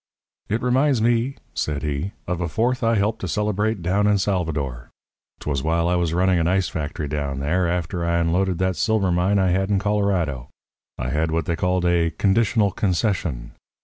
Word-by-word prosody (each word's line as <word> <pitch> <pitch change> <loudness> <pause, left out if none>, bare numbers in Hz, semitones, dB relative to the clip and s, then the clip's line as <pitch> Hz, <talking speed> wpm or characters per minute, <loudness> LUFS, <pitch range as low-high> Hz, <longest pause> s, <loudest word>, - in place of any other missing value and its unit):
"It 110 +3 -1
reminds 130 +1 +2
me," 120 +4 +1 0.2
said 75 -1 -2
he, 75 +6 -2
"of 90 -2 -3
a 90 - 0
Fourth 120 - 0
I 115 0 +3
helped 105 +2 0
to 95 - -3
celebrate 105 +1 -1
down 100 +4 +2
in 105 -1 +4
Salvador. 80 -11 -2 0.5
'Twas 70 -2 -2
while 85 +2 +1
I 90 - +1
was 85 -2 +1
running 90 +1 +2
an 85 - +1
ice 95 0 +1
factory 75 -1 -4
down 70 -2 -3
there, 85 +6 +1
after 85 0 -2
I 85 0 +1
unloaded 90 +2 +1
that 95 0 0
silver 100 +3 +1
mine 90 +4 +2
I 95 -2 +2
had 95 +2 0
in 100 - +2
Colorado. 95 -10 0 0.5
I - - -3
had 80 +3 0
what 80 -1 -1
they 85 - -1
called 90 +2 0
a 85 -1 +2
'conditional 100 +4 +2
concession.' 90 - -1
90 Hz, 185 wpm, -22 LUFS, 80-100 Hz, 0.5 s, in